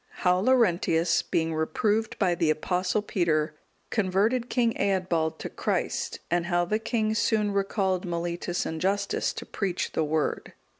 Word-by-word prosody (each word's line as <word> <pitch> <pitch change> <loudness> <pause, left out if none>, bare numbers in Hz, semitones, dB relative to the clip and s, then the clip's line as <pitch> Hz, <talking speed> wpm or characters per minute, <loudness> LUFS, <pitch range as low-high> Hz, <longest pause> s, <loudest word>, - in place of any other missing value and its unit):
How 180 0 +4
Laurentius, 180 -8 +3
being 165 -1 -1
reproved 205 +8 0
by 185 -3 +2
the 165 -2 +1
Apostle 180 +6 0
Peter, 160 -6 0 0.4
converted 220 +4 +1
King 235 -2 +2
Eadbald 180 -5 0
to - - -5
Christ; - - -2
and 175 0 +1
how 175 -1 +2
the 215 +5 0
king 225 -1 0
soon 215 -1 +1
recalled 195 -2 0
Mellitus 175 0 -2
and 160 -1 -4
Justus 200 +1 0
to - - -7
preach 190 -4 -2
the 160 - 0
Word. 155 0 -1
185 Hz, 145 wpm, -27 LUFS, 170-210 Hz, 0.4 s, How